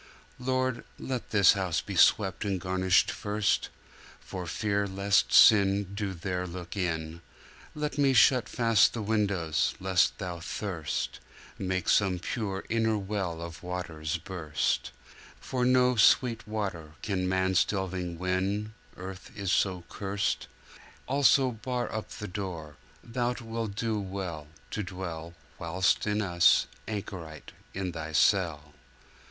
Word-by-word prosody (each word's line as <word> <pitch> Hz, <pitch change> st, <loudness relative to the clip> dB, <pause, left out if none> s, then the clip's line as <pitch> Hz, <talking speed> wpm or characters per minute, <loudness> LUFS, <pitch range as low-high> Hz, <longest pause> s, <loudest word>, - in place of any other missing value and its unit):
Lord, 130 Hz, -1 st, -1 dB
let 130 Hz, -2 st, -4 dB
this 100 Hz, -4 st, +6 dB
house 95 Hz, -4 st, 0 dB
be -, -, -6 dB
swept 95 Hz, -3 st, +4 dB
and 100 Hz, -3 st, -1 dB
garnished 95 Hz, +1 st, +2 dB
first! 105 Hz, 0 st, 0 dB, 0.5 s
For 90 Hz, -2 st, -7 dB
fear 100 Hz, +2 st, 0 dB
lest 100 Hz, +1 st, +2 dB
sin 100 Hz, -2 st, +6 dB
Do 100 Hz, -2 st, -3 dB
there 90 Hz, +1 st, -3 dB
look 90 Hz, +3 st, -7 dB
in, 80 Hz, -3 st, -2 dB, 0.5 s
Let 150 Hz, -1 st, -3 dB
me 140 Hz, -2 st, +4 dB
shut 125 Hz, -2 st, +5 dB
fast 115 Hz, -4 st, +4 dB
the 115 Hz, -, -3 dB
windows: 100 Hz, -7 st, 0 dB
lest 95 Hz, -3 st, +2 dB
Thou 90 Hz, -3 st, -5 dB
thirst, 85 Hz, -2 st, -3 dB, 0.4 s
Make 95 Hz, -1 st, -2 dB
some 95 Hz, -3 st, +3 dB
pure 95 Hz, 0 st, -3 dB
inner 110 Hz, -1 st, +1 dB
well 95 Hz, -5 st, -3 dB
of 85 Hz, -1 st, -8 dB
waters 85 Hz, -3 st, -4 dB
burst: 80 Hz, -4 st, -2 dB, 0.5 s
For 125 Hz, -1 st, -2 dB
no 125 Hz, 0 st, +4 dB
sweet 115 Hz, +2 st, +4 dB
water 95 Hz, -8 st, -4 dB
can 95 Hz, -3 st, -1 dB
man's 95 Hz, 0 st, +3 dB
delving 95 Hz, -3 st, -3 dB
win— 95 Hz, +4 st, -1 dB, 0.2 s
Earth 95 Hz, +3 st, -8 dB
is 100 Hz, -3 st, -1 dB
so 90 Hz, -3 st, +1 dB
curst. 100 Hz, 0 st, -2 dB, 0.6 s
Also 135 Hz, -1 st, +4 dB
bar 120 Hz, +2 st, -3 dB
up 110 Hz, -1 st, -4 dB
the 105 Hz, -, -7 dB
door: 90 Hz, -6 st, -6 dB, 0.3 s
Thou 120 Hz, +1 st, -1 dB
wilt 115 Hz, -3 st, -4 dB
do 110 Hz, 0 st, -1 dB
well 95 Hz, -6 st, -5 dB, 0.2 s
To 105 Hz, -, -2 dB
dwell, 85 Hz, -3 st, -6 dB, 0.2 s
whilst 90 Hz, +4 st, +1 dB
with 105 Hz, +1 st, +1 dB
us, 85 Hz, -4 st, +4 dB, 0.2 s
anchorite 95 Hz, -7 st, -6 dB, 0.2 s
in 95 Hz, -2 st, -2 dB
Thy 80 Hz, -1 st, -6 dB
cell. 80 Hz, -6 st, +2 dB
95 Hz, 130 wpm, -29 LUFS, 90-110 Hz, 0.6 s, this